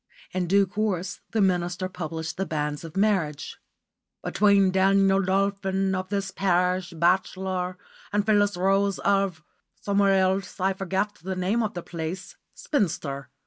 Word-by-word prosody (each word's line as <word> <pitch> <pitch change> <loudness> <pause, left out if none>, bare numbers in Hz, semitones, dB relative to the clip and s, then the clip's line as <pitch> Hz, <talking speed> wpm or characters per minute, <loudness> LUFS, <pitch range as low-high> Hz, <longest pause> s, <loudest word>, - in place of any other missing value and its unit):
In 180 -1 -1
due 200 +2 +4
course 195 -2 -2
the 225 - 0
minister 180 -1 +1
published 160 -3 -5
the 195 - -1
banns 150 -1 -2
of 165 +2 -8
marriage 185 -8 0 0.6
"between 200 -2 +3
Daniel 195 +1 +4
Dolphin, 195 0 0
of 185 0 -3
this 200 -1 -2
parish, 180 -1 +1
bachelor, 185 +2 0 0.3
and 205 0 +1
Phyllis 205 -2 +3
Rose, 195 +1 +2
of" 195 -5 0 0.4
somewhere 200 -1 +3
else, 190 +1 0
I 190 +1 +2
forget 195 +2 -2
the 190 +2 -4
name 190 +6 0
of 215 -4 -2
the 175 - -5
place 170 +3 -6 0.2
"spinster." 160 - -2
190 Hz, 140 wpm, -25 LUFS, 180-195 Hz, 0.6 s, due